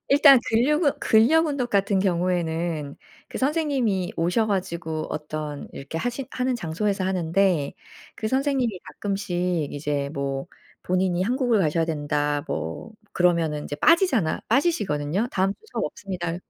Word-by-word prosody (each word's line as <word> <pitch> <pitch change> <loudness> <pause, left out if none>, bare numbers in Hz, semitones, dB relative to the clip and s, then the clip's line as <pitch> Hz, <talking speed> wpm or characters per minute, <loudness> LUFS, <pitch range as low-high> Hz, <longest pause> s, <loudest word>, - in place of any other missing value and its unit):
일단 280 -1 +8
근력 275 +9 +2
운 285 - +4
근력 295 +10 +4
운동 280 -4 -1
같은 200 -2 +1
경우에는 170 -5 -1 0.3
그 - - -6
선생님이 265 - 0
오셔 180 +7 +1
가지고 170 -5 -2
어떤 150 -1 -5
이렇게 140 +4 -6
하시 245 +4 -3
하는 255 0 -1
장소에서 195 +1 -1
하는데 180 -3 +1 0.4
그 215 - -3
선생님이 260 -6 0
가끔씩 180 -6 -2
이제 145 -1 -2
뭐 135 -1 -3 0.4
본인이 185 0 +1
한국을 245 0 +1
가셔야 165 -1 +2
된다 145 -2 -1
뭐 80 - -5 0.2
그러면은 165 -4 +1
이제 145 - -5
빠지잖아 300 - +3
빠지시거든요. 205 - +1
"다음 195 +1 +1
주 - - -39
수업 - - -1
없습니다." 175 -4 -4
185 Hz, 325 characters per minute, -24 LUFS, 160-235 Hz, 0.4 s, 일단